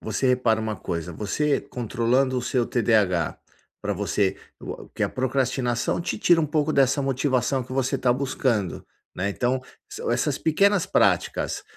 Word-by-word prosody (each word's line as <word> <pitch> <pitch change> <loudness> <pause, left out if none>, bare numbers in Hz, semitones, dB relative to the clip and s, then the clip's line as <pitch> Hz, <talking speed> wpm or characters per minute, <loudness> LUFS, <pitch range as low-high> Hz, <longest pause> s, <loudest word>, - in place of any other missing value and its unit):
você 110 +4 -1
repara 120 -3 +2
uma 110 -1 -2
coisa, 85 -1 -4
você 140 - 0
controlando 125 +2 0
o 125 - -4
seu 125 -2 0
TDH, 105 -8 +1 0.4
pra 105 0 -2
você, 100 0 0 0.2
o - - -8
que - - -5
a - - +2
procrastinação 130 -1 0
te 170 - -3
tira 175 -2 +4
um 155 - +1
pouco 155 +1 0
dessa 135 0 +3
motivação 130 -1 0
que 130 - -10
você 135 +1 0
tá 125 -1 +2
buscando, 125 -7 -1 0.3
né, 95 +2 -1
então, 125 +5 0 0.5
essas - - 0
pequenas 195 +3 +3
práticas, 195 - +1
125 Hz, 155 wpm, -24 LUFS, 110-135 Hz, 0.5 s, tira